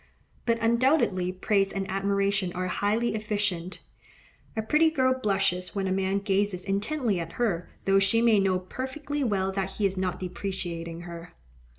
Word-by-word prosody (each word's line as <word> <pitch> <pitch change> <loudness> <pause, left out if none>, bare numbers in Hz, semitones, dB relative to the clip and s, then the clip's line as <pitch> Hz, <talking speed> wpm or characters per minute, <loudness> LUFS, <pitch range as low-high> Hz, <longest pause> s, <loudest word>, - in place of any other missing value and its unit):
But 230 0 +3
undoubtedly 230 - +2
praise 195 +1 +1
and 195 -1 -3
admiration 195 -1 0
are 185 +1 -2
highly 210 +5 0
efficient: 205 -4 -2 0.8
a 220 - 0
pretty 305 +8 +4
girl 260 -4 +2
blushes 195 -7 0
when 195 -1 0
a 190 - 0
man 190 +1 +1
gazes 200 -2 0
intently 210 - 0
at 165 0 -5
her, 195 -8 -1 0.2
though 195 0 +5
she 195 +4 +3
may 230 -3 +5
know 190 -1 +2
perfectly 265 +9 -4
well 195 -5 +1
that 195 0 -2
he 210 - 0
is 190 -1 0
not 185 -1 -1
depreciating 175 -3 -4
her. 170 0 -9
195 Hz, 160 wpm, -27 LUFS, 185-220 Hz, 0.8 s, though